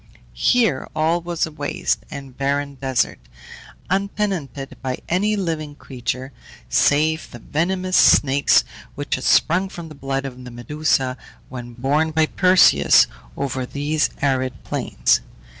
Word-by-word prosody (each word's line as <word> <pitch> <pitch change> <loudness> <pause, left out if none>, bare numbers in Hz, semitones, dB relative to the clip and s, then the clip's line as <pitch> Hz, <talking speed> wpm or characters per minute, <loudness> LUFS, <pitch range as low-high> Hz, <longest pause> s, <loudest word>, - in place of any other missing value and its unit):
Here 195 - +2
all 160 +2 +1
was 170 -1 -1
a 160 - -9
waste 145 -1 -2
and 135 -2 -9
barren 140 +1 -1
desert, 135 -2 -1 0.7
untenanted 190 - -2
by 130 -1 -3
any 205 +5 +1
living 160 -6 -3
creature, 130 0 -5 0.4
save 155 - +2
the - - -10
venomous 185 +9 -1
snakes 140 0 +5 0.3
which - - -4
had - - -1
sprung 185 +4 +3
from 170 -3 -9
the - - -10
blood 135 -1 -3
of 125 -1 -8
the 125 - -8
Medusa 130 +1 -1 0.3
when 120 -2 -8
borne 140 +6 +1
by 160 0 +2
Perseus 170 - +5 0.3
over 130 -2 -2
these 145 +4 -1
arid 130 -2 0
plains. - - +1
145 Hz, 130 wpm, -21 LUFS, 130-165 Hz, 0.7 s, snakes